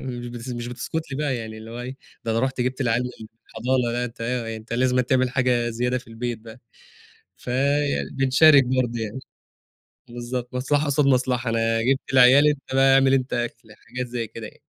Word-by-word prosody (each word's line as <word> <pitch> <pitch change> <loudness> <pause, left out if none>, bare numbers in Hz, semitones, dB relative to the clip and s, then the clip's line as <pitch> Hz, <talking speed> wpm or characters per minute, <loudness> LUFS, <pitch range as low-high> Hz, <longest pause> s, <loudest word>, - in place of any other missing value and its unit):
مش 120 -2 -6
بتس 120 +1 -8
مش 120 -1 -4
بتسكت 135 +6 -5
لي - - -3
بقى 145 -4 -1
يعني، 110 -1 -7
اللي 110 +1 -10
هو 120 +1 -6
إيه، 130 +2 -7 0.3
ده 115 - -2
أنا 115 - +1
رحت 130 0 -1
جبت 130 +2 -2
العيال 120 -2 +1
من 125 -3 -8 0.2
الحضانة، 125 -1 -1
لأ، 120 +1 -1
أنت 115 -1 -9
أنت 115 -2 -4
لازمًا 125 +1 +2
تعمل 130 0 +1
حاجة 125 -2 +1
زيادة 125 +2 -1
في 125 - -15
البيت 115 0 -4
بقى. 110 +2 -13 0.8
فبنشارك 140 +2 +3
برضه 125 -2 -1
يعني. 110 +3 -4 0.9
بالضبط، 120 +1 -5
مصلحة 145 +4 +1
قصاد 145 0 +2
مصلحة، 125 -2 +1
أنا 115 0 +1
جبت 135 +3 -1
العيال 130 +3 +7
أنت 145 -2 0
بقى 135 0 +5
أعمل 135 0 +4
أنت 130 -1 0
أكل، 115 -2 -4
حاجات 125 +1 -4
زي 120 -1 -4
كده 110 +1 -8
يعني. - - -18
125 Hz, 185 wpm, -23 LUFS, 120-130 Hz, 0.9 s, العيال